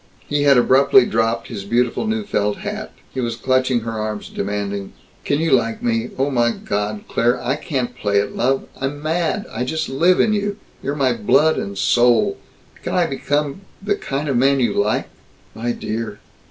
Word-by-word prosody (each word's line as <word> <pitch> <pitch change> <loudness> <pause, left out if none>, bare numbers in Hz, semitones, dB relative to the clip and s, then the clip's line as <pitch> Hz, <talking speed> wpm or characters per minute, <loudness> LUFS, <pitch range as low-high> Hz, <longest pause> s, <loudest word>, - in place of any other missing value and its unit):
He 145 0 +1
had 140 -2 +6
abruptly 130 +1 +5
dropped 115 0 0
his 105 -5 -6
beautiful 120 - 0
new 220 0 -1
felt 105 - -1
hat. - - -5 0.2
He 130 - -2
was 115 -1 -2
clutching 130 0 +1
her 115 +1 -4
arms, 110 -1 -4
demanding, 100 -1 -3 0.3
"Can 145 - +1
you 165 0 0
like 115 -3 +1
me? 115 0 0
Oh 135 +2 +1
my 120 -2 +3
God, 105 +1 -3
Claire, 120 +2 +1
I 135 - -1
can't 125 -6 -3
play 100 -4 +1
at 100 - -3
love. 135 +2 0
I'm 145 +2 -4
mad 170 +5 0
I 125 - -2
just 155 +5 -2
live 170 +7 +3
in 215 - +4
you. 205 0 -1 0.2
You're 140 +2 -2
my 135 -4 +2
blood 135 +8 +3
and 100 0 -5
soul. 120 +1 +3 0.4
Can - - -3
I 180 - +3
become 145 +2 -1 0.2
the 205 +1 0
kind 145 -6 -3
of 135 -4 +1
man 135 +2 +3
you 120 - +2
like?" 105 +1 0 0.5
"My 120 +2 -2
dear!" 110 -2 -4
125 Hz, 185 wpm, -20 LUFS, 115-145 Hz, 0.5 s, had